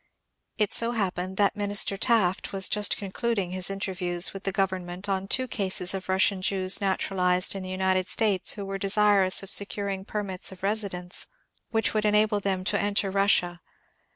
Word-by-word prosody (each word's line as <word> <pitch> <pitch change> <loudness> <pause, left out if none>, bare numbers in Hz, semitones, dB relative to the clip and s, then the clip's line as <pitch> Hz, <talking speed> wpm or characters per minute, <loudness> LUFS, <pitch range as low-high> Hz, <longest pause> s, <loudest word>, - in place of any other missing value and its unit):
It 210 -3 +1
so 235 +1 +2
happened 190 -3 -3
that 205 0 +2
Minister 205 -1 +1
Taft 195 -4 +1
was 190 -1 +3
just 210 -1 +1
concluding 200 -1 -2
his 185 0 -1
interviews 185 -3 -2
with 195 - -9
the 195 - 0
government 185 -1 -2
on 195 -1 -2
two 255 +5 +1
cases 190 -5 +1
of 190 -1 -6
Russian 190 0 +2
Jews 190 +1 +1
naturalized 185 -2 +1
in 195 - -5
the 185 - -7
United 185 0 0
States 205 -4 +1
who 200 -2 -6
were 195 0 -5
desirous 195 -1 +3
of 195 - -8
securing 200 -1 0
permits 195 -3 -3
of 185 0 -13
residence 195 -4 -2 0.2
" - - -53
which 225 -1 0
would 215 -1 0
enable 210 0 +3
them 195 -2 -2
to 200 +1 0
enter 205 -1 0
Rus 200 +1 +3
sia. 175 0 0
195 Hz, 180 wpm, -26 LUFS, 185-205 Hz, 0.2 s, was